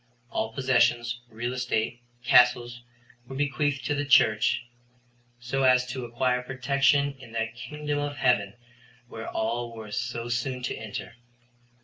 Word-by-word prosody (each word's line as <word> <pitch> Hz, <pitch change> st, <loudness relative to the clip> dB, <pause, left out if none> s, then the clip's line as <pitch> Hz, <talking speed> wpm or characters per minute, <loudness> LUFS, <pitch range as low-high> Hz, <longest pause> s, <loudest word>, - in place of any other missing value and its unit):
All 110 Hz, -, -1 dB
possessions, 120 Hz, -1 st, +2 dB
real 120 Hz, +2 st, -4 dB
estate, 120 Hz, -1 st, -1 dB, 0.2 s
castles, 120 Hz, -1 st, +4 dB, 0.5 s
were 135 Hz, -, -8 dB
bequeathed 145 Hz, 0 st, 0 dB
to -, -, +1 dB
the 145 Hz, 0 st, -1 dB
Church, 115 Hz, -4 st, +4 dB, 0.7 s
so 120 Hz, +3 st, -2 dB
as 130 Hz, -1 st, +5 dB
to 125 Hz, -1 st, -4 dB
acquire 125 Hz, +1 st, 0 dB
protection 140 Hz, +2 st, +2 dB
in 120 Hz, -3 st, -13 dB
that 110 Hz, -1 st, -2 dB
kingdom 150 Hz, +3 st, -4 dB
of 145 Hz, 0 st, -3 dB
heaven 120 Hz, -6 st, +2 dB, 0.5 s
where 115 Hz, 0 st, -7 dB
all 115 Hz, +1 st, -2 dB
were 110 Hz, -2 st, -9 dB
so 120 Hz, +2 st, -3 dB
soon 125 Hz, +1 st, -2 dB
to 120 Hz, -, -2 dB
enter. 110 Hz, +1 st, -7 dB
125 Hz, 135 wpm, -27 LUFS, 115-135 Hz, 0.7 s, as